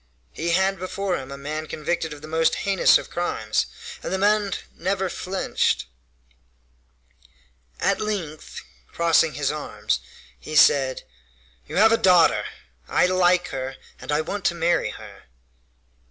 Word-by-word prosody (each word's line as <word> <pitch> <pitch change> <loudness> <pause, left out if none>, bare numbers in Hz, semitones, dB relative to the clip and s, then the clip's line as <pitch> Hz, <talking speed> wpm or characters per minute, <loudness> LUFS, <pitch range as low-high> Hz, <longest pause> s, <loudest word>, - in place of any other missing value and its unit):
He 170 +1 -2
had 190 +1 +2
before 185 +1 -2
him 130 0 -6
a 140 - -6
man 155 +3 -5
convicted 160 +1 -2
of 150 0 -10
the - - -8
most 160 +1 +2
heinous 195 -2 +5
of - - -9
crimes, 110 - -1 0.3
and - - -5
the 190 - 0
man 205 0 +2 0.2
never 190 +1 -1
flinched. 190 - -1 1.9
At - - +1
length, 180 -8 -4 0.3
crossing 165 -2 +2
his 145 -1 0
arms, 105 - -2 0.4
he 155 - -7
said: 135 -3 +4 0.6
"You - - -7
have 220 +3 +6
a 230 - +5
daughter! 180 -5 +4 0.4
I - - +3
like 180 -1 +3
her 130 0 -5 0.2
and - - -6
I 150 +1 +2
want 200 +5 -5
to 175 - +2
marry 170 +1 +1
her!" - - -11
170 Hz, 140 wpm, -23 LUFS, 150-190 Hz, 1.9 s, have